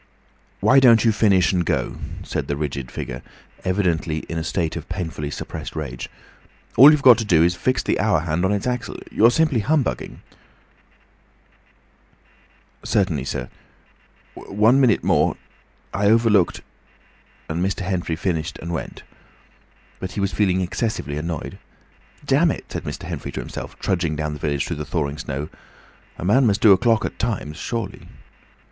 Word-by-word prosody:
"Why 135 - +6
don't 120 -4 +6
you 115 - +5
finish 100 -4 +3
and 90 -1 +1
go?" - - -1 0.3
said - - -3
the 70 - -1
rigid 70 -4 -4
figure, 60 0 -6 0.4
evidently 85 -5 0
in 85 - -3
a - - -3
state 80 -1 -2
of - - -7
painfully 80 -4 -4
suppressed - - -7
rage. 70 -6 -5 0.7
"All 135 +6 +10
you've 150 -2 +3
got 125 -2 +8
to - - 0
do 85 -6 +4
is 85 +1 +3
to 90 - -13
fix 130 - 0
the - - 0
hour 105 -8 +2
hand 80 +1 -1
on 95 - +2
its 100 -1 -1
axle. 125 -4 -3
You're 115 +2 +5
simply 140 0 +2
humbugging—" 145 +5 -1 2.6
"Certainly, 85 -10 0
sir—one 110 - -3
minute 120 -5 +3
more. - - +2 0.6
I 100 0 +1
overlooked—" 110 -4 +3 0.9
and 85 +2 -2
Mr. 95 +1 -1
Henfrey 90 -3 -2
finished 80 -2 -2
and 85 - -6
went. 85 - -6 1.0
But 95 0 -6
he - - -4
went 100 0 0
feeling 95 0 +1
excessively 90 - -2
annoyed. 80 0 -5 0.7
"Damn 145 +5 +3
it!" - - -4
said - - -5
Mr. - - -6
Henfrey - - -5
to - - -4
himself, - - -7
trudging 75 - -1
down 75 0 -3
the 75 - -7
village 70 -2 -1
through 85 - -4
the 75 - -4
thawing 75 -1 -3
snow; 75 -1 -4 0.7
"a - - -6
man 120 +6 +4
must 100 -2 +1
do 110 - +7
a 95 - +7
clock 115 -1 +2
at - - -6
times, 100 -9 -2
surely." 115 +2 -5
95 Hz, 160 wpm, -22 LUFS, 80-115 Hz, 2.6 s, All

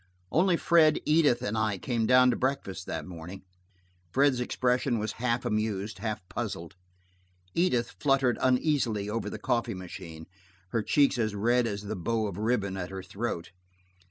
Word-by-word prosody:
Only 180 +1 +3
Fred, 160 -3 +4
Edith 150 -5 +3
and 100 - -2
I 110 -2 0
came 115 +2 -1
down 125 +1 +6
to - - 0
breakfast 125 -9 -2
that - - -4
morning. 90 +2 -9 0.7
Fred's 135 +1 +3
expression 125 0 +1
was 110 0 -2
half 120 -1 0
amused, 105 -2 -2
half 105 -4 -4
puzzled. 85 -2 -5 0.8
Edith 125 -10 +1
fluttered 135 -3 +2
uneasily 125 -6 +1
over 105 -2 -2
the - - -6
coffee 115 -2 -1
machine, 85 -3 -9 0.4
her 115 - 0
cheeks 140 +3 +3
as 110 -2 0
red 120 +4 +2
as 100 -2 -4
the 105 +1 -4
bow 110 +4 -1
of 100 -2 -5
ribbon 105 -4 0
at 90 -1 -4
her 95 -1 -6
throat. 95 -5 -4
115 Hz, 155 wpm, -28 LUFS, 100-125 Hz, 0.8 s, down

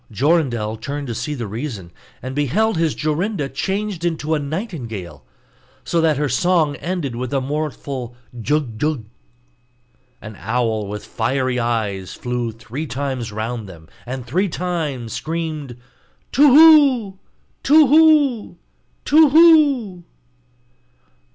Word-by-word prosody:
Jorindel 120 - 0
turned 145 +4 -5
to - - -2
see 150 +6 -4
the 120 -4 -5
reason, 105 - -6 0.3
and 130 +1 -5
beheld 185 - +1
his 160 -2 0
Jorinda 155 0 -2
changed 195 +5 -3
into 160 -2 -1
a 155 - +1
nightingale, 125 - -6 0.6
so 170 - 0
that 160 -3 +2
her 150 0 0
song 155 +2 +1
ended 165 -8 -4
with 125 0 -4
a - - +2
mournful 135 -3 -4 0.3
jug, 135 -4 -1
jug. 150 -6 -1 1.1
An 105 0 -10
owl 110 -1 -1
with 105 +1 -7
fiery 130 -1 -1
eyes 110 -5 -2
flew 125 -1 -3
three 125 +7 -7
times 130 -3 -4
round 110 0 -5
them, 80 -3 -13 0.2
and 130 -1 -5
three 185 +10 0
times 155 -10 -3
screamed: 155 -6 -4 0.5
'Tu 290 +2 +5
whu! 275 -10 +6 0.4
Tu 305 +2 +6
whu! 290 - +3 0.5
Tu 310 +1 +6
whu! 285 - +4
145 Hz, 125 wpm, -20 LUFS, 120-180 Hz, 1.1 s, whu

